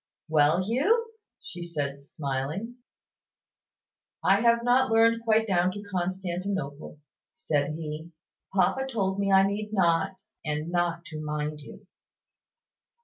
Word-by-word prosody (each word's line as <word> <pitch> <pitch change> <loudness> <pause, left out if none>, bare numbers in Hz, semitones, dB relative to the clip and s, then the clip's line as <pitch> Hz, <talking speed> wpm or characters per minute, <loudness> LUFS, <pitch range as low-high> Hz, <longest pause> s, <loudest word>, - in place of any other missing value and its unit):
"Well, 155 +3 +3
Hugh!" 400 - +1 0.3
said 155 -6 -4
she, 140 - -22
smiling. 150 - -4 1.5
"I 195 +2 +4
have 235 0 +4
not 255 +2 +3
learned 230 +1 +4
quite 220 -1 +3
down 185 -3 +2
to 205 - -7
`Constantinople,'" 180 -4 -3 0.4
said 145 0 -1
he. 160 0 -6 0.4
"Papa 265 +7 +2
told 195 -4 -1
me 200 0 +1
I 190 0 +7
need 205 +2 -2
not, 170 -3 +2 0.3
and 150 +2 -3
not 170 -1 0
to 155 -1 -7
mind 150 0 -3
you." 205 +7 -13
185 Hz, 120 wpm, -27 LUFS, 155-215 Hz, 1.5 s, I